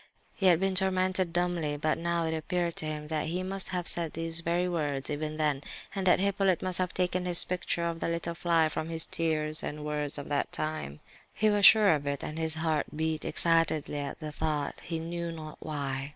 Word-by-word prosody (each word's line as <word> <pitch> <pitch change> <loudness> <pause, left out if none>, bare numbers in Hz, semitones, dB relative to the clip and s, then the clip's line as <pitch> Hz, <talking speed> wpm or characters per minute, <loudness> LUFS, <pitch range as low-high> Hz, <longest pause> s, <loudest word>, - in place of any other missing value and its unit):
He 195 - +2
had 170 -3 +6
been 195 0 +1
tormented 185 -1 +2
dumbly; 170 -4 0
but 155 +2 0
now 170 0 0
it 160 0 -1
appeared 170 +1 -2
to 155 - -2
him 150 -1 -5
that 155 -1 -1
he 180 +3 -2
must 190 +1 -1
have 180 -2 -3
said 170 -2 +2
these 165 0 -2
very 170 +2 0
words—even 150 -2 -2
then—and 155 +6 -2
that 180 - +5
Hippolyte 195 -2 +1
must 185 -1 +2
have 185 -1 0
taken 180 0 -1
his 175 -1 +3
picture 180 -1 -2
of 165 -1 -2
the - - -2
little 170 0 -2
fly 165 -1 +2
from 155 +1 -4
his 165 -1 +5
tears 155 -2 -1
and 150 0 -5
words 150 -1 -2
of 145 - -6
that 145 -1 -1
time. 155 - -3 0.3
He 215 0 +3
was 205 -1 +8
sure 210 -5 +7
of 145 -2 -2
it, 140 -1 -2
and 155 +1 -5
his 160 -1 0
heart 160 -2 0
beat 160 0 -1
excitedly 165 -3 +1
at 140 - -5
the 155 -1 -6
thought, 150 -2 -2
he 165 - -4
knew 170 +1 -4
not 155 -2 -8
why. 140 -3 -4
165 Hz, 210 wpm, -29 LUFS, 155-180 Hz, 0.3 s, was